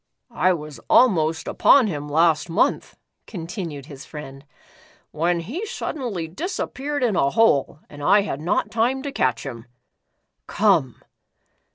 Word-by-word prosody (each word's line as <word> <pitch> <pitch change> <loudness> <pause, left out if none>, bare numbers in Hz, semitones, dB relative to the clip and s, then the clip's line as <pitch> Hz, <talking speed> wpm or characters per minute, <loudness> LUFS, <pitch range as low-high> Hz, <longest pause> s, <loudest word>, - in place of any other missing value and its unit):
"I 185 -5 +3
was 150 -3 -7
almost 165 -10 +3
upon 275 -4 +5
him 150 -7 -4
last 160 +1 +2
month," 165 - 0 0.3
contin 175 -1 -5
ued 140 -3 -9
his 140 -3 -11
friend, 135 -3 -10 0.7
"when 170 +2 0
he 260 - -5
suddenly 225 - -4
disappeared 290 - -4
in 225 -5 +1
a 140 - +2
hole 150 -6 +2
and 145 -1 -12
I 200 +8 +5
had 175 -8 -4
not 170 - -1
time 245 +4 0
to 285 - -4
catch 125 - 0
him. 120 -3 -8 0.8
Come." - - +2
170 Hz, 140 wpm, -22 LUFS, 150-225 Hz, 0.8 s, upon